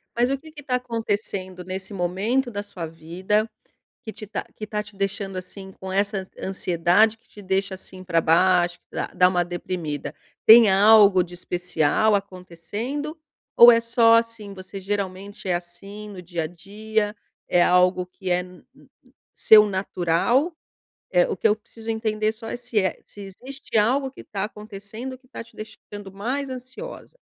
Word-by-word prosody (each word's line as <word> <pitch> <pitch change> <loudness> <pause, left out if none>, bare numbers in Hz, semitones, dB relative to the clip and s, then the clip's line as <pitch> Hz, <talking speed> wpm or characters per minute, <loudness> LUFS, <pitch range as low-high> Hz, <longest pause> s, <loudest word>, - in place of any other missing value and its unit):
Mas 240 +2 +2
o 275 - 0
que 315 +3 -15
que 295 -1 -11
está 260 -2 -1
acontecendo 205 -6 -3
nesse 190 +2 -6
momento 200 +9 0
da 205 0 -4
sua 185 -5 -7
vida 180 +7 -2 0.6
que 220 - -6
te 215 -1 -10
tá 210 - -4
que 215 - -5
está 210 0 -3
te 205 -1 -16
deixando, 195 -1 -3
assim, 190 +1 -8
com 190 0 -6
essa 195 -1 0
ansiedade 190 +4 +2
que - - -36
te 205 - -13
deixa, 190 0 -1
assim, 185 0 -10
pra 170 -2 +1
baixo, 175 +2 +3
que - - -15
dá - - -1
dá 180 0 +5
uma 175 -1 +1
deprimida? 175 -4 -5 0.3
Tem 225 -2 +9
algo 200 -1 +7
de 175 +1 -9
especial 180 +3 +1
acontecendo 200 - -4 0.4
ou 235 +1 +11
é 230 0 +5
só, 230 0 +4
assim, 230 -3 0
você 190 +1 -9
geralmente 200 0 -4
é 180 - +1
assim, 195 +5 -6
no 190 -3 -9
dia 170 -2 -3
a - - -1
dia, 210 +5 -3 0.3
é 175 - +3
algo 180 0 +3
que 185 0 -7
é 175 0 +3
n 180 0 -15
n - - -21 0.5
seu 210 -1 +7
natural? 195 - +1 0.6
Eh, - - +4
o 435 - -1
que - - +3
eu 210 - +3
preciso 225 +1 -12
entender 215 -1 0
só 225 0 -9
é - - -3
se 245 -2 -5
é 185 -2 -1
se 205 - -12
existe 250 +6 -5
algo 260 +5 +2
que - - -12
está 195 -1 -4
acontecendo, 215 +4 -7
que 255 0 -28
tá 245 - -8
te - - -22
deixando 205 -2 -10
mais 255 +8 -3
ansiosa. 260 - -9
200 Hz, 175 wpm, -24 LUFS, 185-225 Hz, 0.6 s, ou